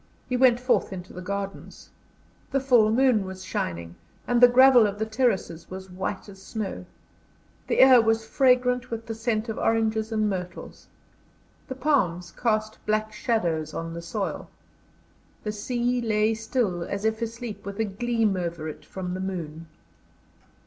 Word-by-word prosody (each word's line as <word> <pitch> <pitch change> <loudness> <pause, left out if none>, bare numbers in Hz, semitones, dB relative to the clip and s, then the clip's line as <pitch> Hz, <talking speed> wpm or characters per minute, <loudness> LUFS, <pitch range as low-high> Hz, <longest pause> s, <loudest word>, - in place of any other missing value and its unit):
He 250 - -1
went 250 -1 +5
forth 250 -4 +1
into 185 -1 -8
the 180 - -7
gardens. 195 +1 -6 0.6
The 275 - +1
full 245 -5 +4
moon 240 -2 +3
was 190 0 -8
shining, 85 - -3 0.3
and 245 0 +2
the 245 - +11
gravel 250 -2 +7
of 205 0 -4
the 220 - -1
terraces 215 -8 -1
was 190 0 -8
white 190 +2 -4
as 195 -1 -13
snow. 210 0 -5 0.8
The - - 0
air 260 -2 +8
was 225 0 +1
fragrant 250 0 +2
with 230 -1 -5
the 225 - -4
scent 225 0 -1
of 220 - -4
oranges 220 0 +1
and 215 -1 +1
myrtles. 180 -3 -6 0.8
The 260 - -5
palms 190 - 0
cast 215 -2 -1
black 215 0 0
shadows 170 -9 -1
on 165 0 -4
the 170 - -6
soil. 195 +4 -4 0.9
The 210 - -2
sea 245 +3 -1
lay 215 -1 +2
still 220 -5 -1
as 200 +4 -4
if 220 +1 0
asleep, 230 -1 -5
with 200 +1 -7
a 225 - +2
gleam 225 0 0
over 170 -3 -3
it 155 - -8
from 180 -2 -6
the 185 - -4
moon. 165 -4 -5
215 Hz, 160 wpm, -26 LUFS, 190-240 Hz, 0.9 s, the